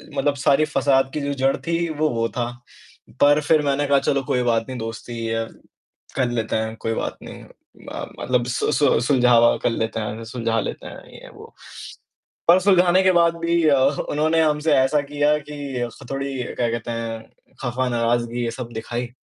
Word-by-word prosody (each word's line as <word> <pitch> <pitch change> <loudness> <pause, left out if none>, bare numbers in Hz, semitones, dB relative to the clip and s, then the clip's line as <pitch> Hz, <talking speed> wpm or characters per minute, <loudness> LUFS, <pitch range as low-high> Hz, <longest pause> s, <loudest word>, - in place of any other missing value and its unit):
मतलब 140 +1 +1
सारी 155 +3 +4
फसाद 135 -3 +2
की 150 - -2
जो 140 0 -2
जड़ 135 0 +1
थी, 170 0 0
वो, 155 0 0
वो 115 -1 -1
था। 120 -1 -2 0.8
पर 145 +1 +5
फिर 155 +1 +3
मैंने 140 +1 +1
कहा 140 -1 +4
चलो 140 0 0
कोई 125 -1 0
बात 115 -2 +1
नहीं 130 - -5
दोस्ती 115 +1 -6
है, 115 0 -1 0.7
कर 130 -3 +1
लेते 115 -2 -2
हैं, 110 0 -2
कोई 115 0 -2
बात - - -3
नहीं - - -10
म - - -10
मतलब 125 -1 0
सु 125 +4 -1
सु 145 -5 +3
सुलझावा 125 -2 +4
कर - - +3
लेते 115 -1 -2
हैं 110 +1 -5
सुलझा 115 -1 -1
लेते - - -5
हैं, - - -10
ये-वो। - - -13 1.0
पर 175 - +8
सुलझाने 185 -1 +4
के 190 0 +4
बाद 170 -1 +3
भी 170 0 +2
अ, 140 -2 +4 0.3
उन्होंने 155 +2 +2
हमसे 150 0 +2
ऐसा 135 +3 +3
किया 145 +1 +2
कि 140 -4 -6
उससे 120 - -13
थोड़ी 135 -1 -3
क्या 120 0 -2
कहते 115 0 -4
हैं, 115 -1 -4 0.4
ख़फ़ा, 125 +1 -1
नाराज़गी 120 0 0
ये 115 - -1
सब 120 -1 -6
दिखाई। 120 +2 -4
130 Hz, 185 wpm, -22 LUFS, 115-150 Hz, 1.0 s, पर